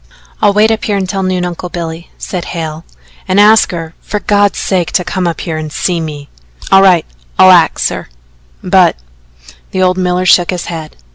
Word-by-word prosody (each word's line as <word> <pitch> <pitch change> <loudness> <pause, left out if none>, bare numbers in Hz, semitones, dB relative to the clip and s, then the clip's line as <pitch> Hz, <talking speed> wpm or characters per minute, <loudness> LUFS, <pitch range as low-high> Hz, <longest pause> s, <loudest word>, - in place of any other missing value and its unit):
"I'll - - +4
wait 210 +2 +3
up 220 - -2
here 205 -2 0
until 195 0 -2
noon, 185 -1 -1
Uncle 180 0 -5
Billy," 170 -1 -6
said 180 -2 -5
Hale. 160 -2 -5 0.5
"Ask 205 +3 +5
her, 165 -3 -6
for 210 - -4
God's 205 -1 +1
sake, 180 -5 -1
to 180 - +2
come 180 0 -2
up 170 - -3
here 160 -3 -4
and 155 -1 -5
see 175 +2 -1
me." 150 -3 -7 0.4
"All 195 - +7
right. 180 -4 +4 0.3
I'll 185 0 +7
axe 175 -3 +3
her, - - -7 0.5
but - - +3 0.4
" - - -23
the 185 - -1
old 185 0 +1
miller 180 0 0
shook 175 -1 +4
his 180 -2 -3
head. 160 -3 -7
180 Hz, 190 wpm, -12 LUFS, 165-190 Hz, 0.5 s, All